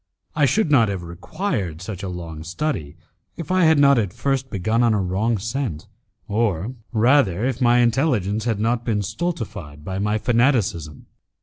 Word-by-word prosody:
I 150 -1 +4
should 185 +3 +1
not 115 -7 +5
have 95 -3 -4
required 90 - -4
such 95 +1 -6
a 95 - -4
long 85 -3 -7
study, 85 - -3 0.4
if 165 0 -6
I 185 -2 +4
had 160 -1 +5
not 140 -2 +5
at 100 -5 -1
first 135 -1 -1
begun 110 +5 0
on 115 -2 +3
a - - +1
wrong 100 +5 0
scent, 115 - -3 0.4
or 105 -1 -1 0.2
rather 115 -4 +3
if 130 0 -2
my 120 -1 +4
intelligence 115 - +1
had 115 -4 0
not 115 +2 0
been 105 -3 -1
stultified 105 - -5
by 95 0 -3
my 105 +1 0
fanaticism. 110 - 0
110 Hz, 170 wpm, -22 LUFS, 95-130 Hz, 0.4 s, not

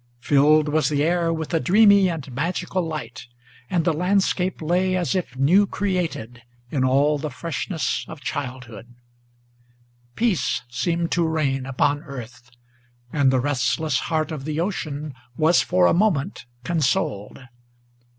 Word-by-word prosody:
Filled 150 +3 +4
was 155 +1 +1
the 145 -1 +1
air 170 +1 +1
with 160 0 -4
a 165 - +3
dreamy 200 +1 +5
and 150 -5 -5
magical 175 +6 -2
light; 145 -10 -6 0.4
and 170 -3 0
the 165 - +2
landscape 185 +1 0
Lay 180 +4 +1
as 180 +1 -1
if 175 -9 -3
new 180 +10 +4
created 170 - -3 0.3
in 135 -3 0
all 140 +3 +2
the 155 +1 -3
freshness 165 +1 -3
of - - -9
childhood. 125 -4 -6 1.2
Peace 225 -7 0
seemed 170 +7 -1
to 170 -2 +1
reign 135 -5 -1
upon 145 +2 +1
earth, 120 -3 -10 0.6
and 140 -2 +3
the 130 - +2
restless 135 +2 0
heart 160 -1 0
of 150 -4 -5
the 155 +1 -3
ocean 155 -5 -3 0.2
Was 160 +2 +4
for 90 -1 +2
a - - +4
moment 175 - 0 0.2
consoled. 130 -10 -1
155 Hz, 140 wpm, -23 LUFS, 135-175 Hz, 1.2 s, dreamy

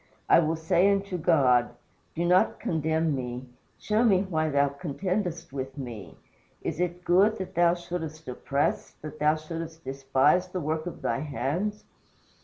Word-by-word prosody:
I - - +7
will 160 0 +1
say 175 +4 +3
unto 200 -1 -1
God, 130 -8 +3 0.4
Do 170 +1 -1
not 180 +2 +3
condemn 160 -1 0
me; 125 0 -5 0.3
show 215 +2 +1
me 195 -5 +4
why 160 -5 -1
thou 140 -1 +3
contendest 175 +3 -3
with 135 0 -5
me. 115 - -8 0.5
Is - - -3
it 180 0 -2
good 200 +5 +4
that 190 - -6
thou 175 0 +4
shouldest 165 -3 -6
oppress, 140 +3 -1
that 155 0 -8
thou 150 +1 +3
shouldest 165 +1 -7
despise 135 +6 +2
the 185 0 -4
work 155 +1 -2
of 175 - -8
thy - - 0
hands?" 155 +8 -2
160 Hz, 155 wpm, -27 LUFS, 140-180 Hz, 0.5 s, I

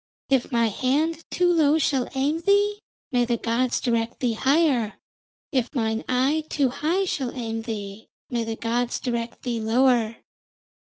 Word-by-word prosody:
If 265 -2 +1
my 235 -2 +2
hand 300 +9 0
too 355 -1 +2
low 310 -2 +4
shall 275 -5 +1
aim 285 +4 +1
thee, 405 +3 +2 0.3
may 245 -2 +3
the 240 0 0
gods 235 +2 0
direct 230 -1 -1
thee 245 -3 +1
higher. 265 -3 +2 0.6
If 260 0 -1
mine 220 -2 0
eye 270 +5 +2
too 275 -3 +1
high 330 +9 0
shall 270 -8 -2
aim 225 -2 -3
thee, 210 -2 -6 0.2
may 235 -2 -1
the 225 0 -3
gods 235 +2 -1
direct 235 -2 -4
thee 240 -3 -2
lower.' 230 0 +2
250 Hz, 155 wpm, -24 LUFS, 230-290 Hz, 0.6 s, low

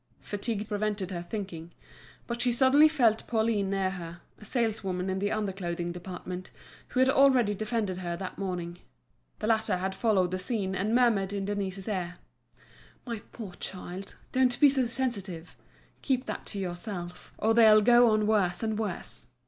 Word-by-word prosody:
Fatigue 210 0 -3
prevented 210 -3 -2
her 175 -2 -3
thinking. 175 -3 -6 0.5
But 235 0 -3
she 245 0 +3
suddenly 265 +5 +6
felt 240 -8 +2
Pauline 220 -3 +1
near 195 -1 0
her, 175 -2 -8 0.2
a 215 - -12
saleswoman 195 -5 -1
in 190 - -1
the 205 +1 0
under 215 -2 -1
clothing 175 -2 -3
department, 180 +1 -7 0.4
who 255 - -2
had 260 - +5
already 265 -5 +5
defended 215 -2 -2
her 175 -2 -3
that 185 0 -6
morning. 175 -3 -4 0.6
The - - -4
latter 220 -3 +2
had 190 +1 -2
followed 190 -4 +2
the 185 - -2
scene, 190 -1 -2
and 205 +4 0
murmured 215 -6 +3
in 200 -1 -2
Denise's 195 -2 -3
ear: 180 -4 -2 0.9
"My 230 -4 -4
poor 210 -6 -8
child, 185 +1 -7 0.2
don't 255 -1 +2
be 290 - +8
so 265 -3 +1
sensitive. 200 -10 -3 0.5
Keep 260 -2 0
that - - -5
to 205 - -4
yourself, 180 -1 -5
or 225 +1 +2
they'll 220 -2 +7
go 240 +1 +6
on 215 -1 +2
worse 200 -3 +1
and 220 -1 -1
worse. 170 - -5
205 Hz, 165 wpm, -29 LUFS, 185-230 Hz, 0.9 s, be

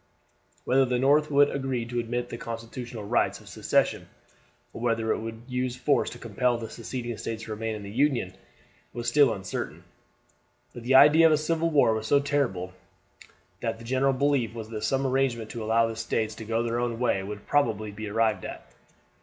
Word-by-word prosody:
Whether 135 +1 +4
the 125 -1 0
North 145 +4 +3
would 145 0 +4
agree 130 -4 -2
to 120 +1 -3
admit 120 +1 -3
the 115 - -6
constitutional 115 0 -6
rights 100 - +1
of - - -17
secession, - - 0 0.6
or - - -8
whether 115 -2 0
it - - 0
would 115 +1 -7
use 125 -1 -2
force 130 +3 +1
to - - -9
compel 120 +2 0
the 115 -1 -7
Seceding 120 0 -5
States 115 0 -5
to 115 - -8
remain 110 +1 -3
in 105 - -7
the 100 - -8
Union, 125 -6 +1 0.6
was 120 0 -5
still 140 0 +5
uncertain; 95 -2 -5 0.9
but 120 - -8
the 125 +3 +2
idea 150 +4 +8
of - - +3
a 155 - +4
civil 165 +2 0
war 140 -7 +4
was 110 0 -3
so 140 - +5
terrible 140 -10 0
a - - -3
one - - -20 0.9
that 115 -1 -2
the 115 - -12
general 130 +3 +2
belief 130 -4 +1
was 110 -1 -7
that 110 -2 -5
some 135 +4 +1
arrangement 130 -4 0
to 115 - -5
allow 115 +1 +3
the 115 0 -4
States 110 -1 -1
to 110 0 -9
go 115 +1 0
their 120 0 -1
own 120 -1 -1
way 115 -5 +1
would 105 +1 -7
probably 110 -7 +1
be 105 +1 -7
arrived 110 -2 +1
at. - - -7
120 Hz, 205 wpm, -27 LUFS, 110-135 Hz, 0.9 s, idea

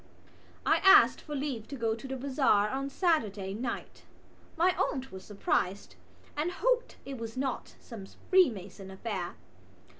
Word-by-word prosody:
I - - +4
asked 385 -1 +6
for 300 - -6
leave 270 -6 -3
to 280 - -6
go 230 -3 0
to 230 +4 -8
the 265 0 -4
bazaar 260 -6 +2
on 275 +2 -3
Saturday 215 - 0
night. 235 +3 -5 0.6
My 355 +2 +3
aunt 265 -1 -2
was 190 0 -9
surprised 195 -1 -1 0.4
and 320 +4 -1
hoped - - 0
it 270 -3 -6
was 225 +1 -6
not 265 -1 -3
some 210 -5 -10 0.2
Freemason 215 - +2
affair. 190 -2 -4
255 Hz, 145 wpm, -30 LUFS, 205-290 Hz, 0.6 s, asked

